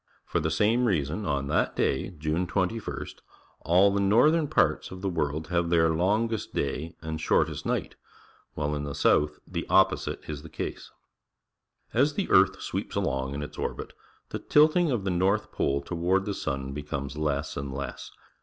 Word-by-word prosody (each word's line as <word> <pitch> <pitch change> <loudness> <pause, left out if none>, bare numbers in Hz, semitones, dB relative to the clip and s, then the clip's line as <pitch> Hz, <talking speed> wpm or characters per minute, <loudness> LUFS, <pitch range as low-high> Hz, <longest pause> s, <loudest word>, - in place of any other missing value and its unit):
For - - -1
the 80 - -1
same 110 +9 +2
r - - +3
eason, 80 +5 -2
on 70 -2 0
that 75 - 0
day. 65 - 0
June 80 +1 -2
21 100 +5 -2
st. - - -13 0.5
aU 90 +4 +5
the 100 - +1
northern 135 +11 +4
parts - - +1
of 95 0 -9
the 100 - -1
world 80 -2 -2
have 85 -1 +1
their 80 -1 +4
longest 105 +7 0
day 80 +4 -2
and 80 0 -4
shortest - - +1
night, - - -2 0.6
while 75 0 -1
in 75 -1 -2
the 70 -1 -5
south 75 0 +3 0.2
t - - 0
he - - -6
op - - +5
posite - - -5
i 75 - -3
s 70 - -7
the 80 - -11
case. - - -5 1.0
As 140 +6 +2
the 200 - -2
earth 95 +1 +4
sweeps - - -4
along 65 +1 -1
in 75 - -3
its 75 - -9
orbit, - - -4 0.4
the - - -4
tilting 155 +3 +4
of 120 -7 0
the 95 - -1
north 95 +4 +1
pole 70 0 0
toward 90 +5 0
the 100 - -2
sun 70 -6 -3
becomes 70 -1 -5
less 75 0 -2
and 70 -1 -4
less. 70 -1 -6
85 Hz, 190 wpm, -27 LUFS, 75-100 Hz, 1.0 s, aU